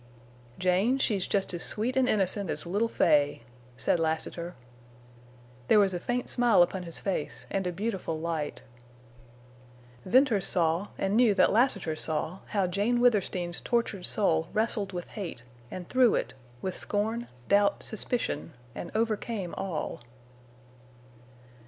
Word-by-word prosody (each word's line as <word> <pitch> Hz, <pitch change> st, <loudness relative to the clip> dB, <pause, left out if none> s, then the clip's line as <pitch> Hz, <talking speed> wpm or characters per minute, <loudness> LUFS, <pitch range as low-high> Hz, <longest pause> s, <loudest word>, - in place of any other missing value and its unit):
"Jane, 185 Hz, +8 st, +2 dB
she's 205 Hz, -8 st, 0 dB
jest 195 Hz, -2 st, 0 dB
as 175 Hz, -, -4 dB
sweet 235 Hz, +4 st, 0 dB
an' 260 Hz, -1 st, +3 dB
innocent 200 Hz, -2 st, +1 dB
as -, -, -3 dB
little 205 Hz, +7 st, 0 dB
Fay," 145 Hz, -, +2 dB, 0.3 s
said 170 Hz, -, +1 dB
Lassiter. 165 Hz, +2 st, -2 dB, 1.1 s
There 215 Hz, -, +6 dB
was 195 Hz, -2 st, +3 dB
a 175 Hz, -, -2 dB
faint 245 Hz, +6 st, -2 dB
smile 235 Hz, -7 st, +4 dB
upon 185 Hz, +2 st, -3 dB
his 170 Hz, -2 st, -6 dB
face 190 Hz, -6 st, -3 dB
and 195 Hz, -2 st, -1 dB
a -, -, -1 dB
beautiful 190 Hz, -4 st, -3 dB
light. 160 Hz, -2 st, -3 dB, 1.4 s
Venters 235 Hz, -3 st, +3 dB
saw, 170 Hz, +2 st, +2 dB
and 195 Hz, +1 st, 0 dB
knew 230 Hz, -3 st, +4 dB
that -, -, +4 dB
Lassiter 205 Hz, -9 st, +2 dB
saw, 160 Hz, +4 st, -1 dB
how 200 Hz, -3 st, 0 dB
Jane 205 Hz, +7 st, 0 dB
Withersteen's 190 Hz, -7 st, +1 dB
tortured 230 Hz, -6 st, 0 dB
soul 165 Hz, -6 st, +2 dB
wrestled 215 Hz, -2 st, 0 dB
with 175 Hz, -2 st, -6 dB
hate 175 Hz, -, -7 dB, 0.3 s
and 180 Hz, -2 st, -7 dB
threw 255 Hz, -3 st, +4 dB
it—with 125 Hz, +8 st, -5 dB
scorn 220 Hz, +3 st, -2 dB, 0.2 s
doubt, 200 Hz, 0 st, +3 dB
suspicion, 220 Hz, -5 st, -2 dB, 0.2 s
and 170 Hz, -, -6 dB
overcame 220 Hz, -4 st, -1 dB
all. 170 Hz, -9 st, -4 dB
195 Hz, 135 wpm, -28 LUFS, 175-220 Hz, 1.4 s, There